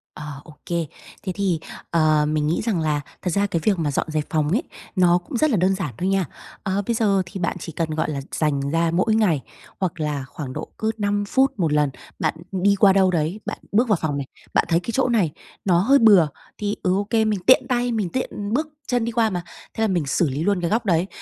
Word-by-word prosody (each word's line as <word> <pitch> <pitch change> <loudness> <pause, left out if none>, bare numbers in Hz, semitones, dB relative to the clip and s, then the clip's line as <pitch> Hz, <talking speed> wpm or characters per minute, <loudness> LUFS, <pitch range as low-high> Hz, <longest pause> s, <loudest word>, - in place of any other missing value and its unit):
Ờ, 150 - -8 0.2
ô 160 - -13
kê. 170 -1 -1 0.4
Thế 190 - -2
thì, 190 -5 0 0.3
ờ, 155 -2 +3
mình 150 0 0
nghĩ 165 - 0
rằng 210 -7 0
là 150 -2 0 0.2
thật 185 - -1
ra 200 +2 +2
cái 170 -4 -1
việc 200 -4 +2
mà 150 -3 0
dọn 140 - -1
dẹp 155 -1 0
phòng 155 -2 +1
ấy, 230 - +1 0.3
nó 175 -1 +5
cũng 180 +7 -5
rất 310 +3 +3
là 225 - +2
đơn 190 +2 +3
giản 180 - -4
thôi 185 - -1
nha. 195 -2 +2 0.4
Ờ, 195 0 0
bây 235 - +2
giờ 200 -4 +2
thì 185 +2 -7
bạn 180 - -1
chỉ 165 - -6
cần, 160 +1 -2
gọi 155 0 -1
là, 140 -1 -3
dành 150 -3 0
ra 165 0 +2
mỗi 215 +5 +2
ngày, 180 -11 +2 0.4
hoặc 180 -3 -2
là 150 -3 -2
khoảng 130 -1 -7
độ 155 - -5
cứ 220 0 0
5 205 -1 0
phút 265 -4 +2
một 160 -4 +1
lần, 150 -1 +3 0.3
bạn 155 - +1 0.2
đi 195 +2 +3
qua 195 -1 +5
đâu 190 -1 +4
đấy, 170 +4 -1
bạn - - -4
bước 230 +5 +3
vào 210 - +4
phòng 145 -3 -1
này, 140 -2 -4 0.3
bạn - - +3
thấy 165 - +3
cái 180 - -5
chỗ 255 +1 +2
này 205 -10 +2 0.3
nó 175 -3 +4
hơi 270 +9 +5
bừa, 200 -8 +7 0.3
thì, 205 0 -2
ừ, 180 - +2
ô 200 - +1
kê, 220 +1 +1
mình 210 -3 0
tiện 260 - +6
tay, 245 0 +1
mình 210 -6 -1
tiện 215 -4 -3
bước 305 +5 +1 0.2
chân 245 -2 +1
đi 235 - -2
qua 225 -1 +2
mà, 180 -3 -3 0.3
thế - - -4
là - - +3
mình 175 -6 0
xử 150 +3 +1
lý 140 +4 -2
luôn 200 -1 +1
cái 170 - 0
góc 225 +3 0
đấy. 175 -1 +2
185 Hz, 255 wpm, -23 LUFS, 160-210 Hz, 0.4 s, bừa